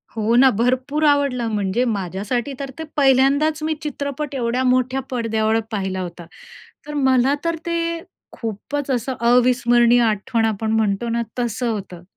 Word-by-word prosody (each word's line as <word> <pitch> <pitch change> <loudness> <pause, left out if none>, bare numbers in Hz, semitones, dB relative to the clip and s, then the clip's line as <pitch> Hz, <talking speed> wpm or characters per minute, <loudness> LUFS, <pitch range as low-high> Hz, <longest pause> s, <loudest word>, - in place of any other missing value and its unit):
हो 225 +1 +1
ना. 260 +2 +7
भरपूर 255 +7 0
आवडलं, 280 -5 +2
म्हणजे 205 +3 0
माझ्यासाठी 210 +5 -2
तर 275 -1 -4
ते - - -3
पहिल्यांदाच 285 +3 +3
मी 315 0 0
चित्रपट 285 -1 -4
एवढ्या 245 0 0
मोठ्या 255 +1 +2
पडद्यावर 225 -2 0
पाहिला 190 -3 -2
होता. 175 -1 -7 0.6
तर 295 - -6
मला 265 -1 +3
तर 335 0 +1
ते 340 0 -1 0.5
खूपच 250 +6 -5
असं 255 +1 -1
अविस्मरणीय 240 0 +4
आठवण 225 +1 0
आपण 220 0 -1
म्हणतो 220 0 0
ना 235 +1 0 0.2
तसं 240 0 -1
होतं. 190 -5 -5
245 Hz, 145 wpm, -21 LUFS, 220-270 Hz, 0.6 s, ना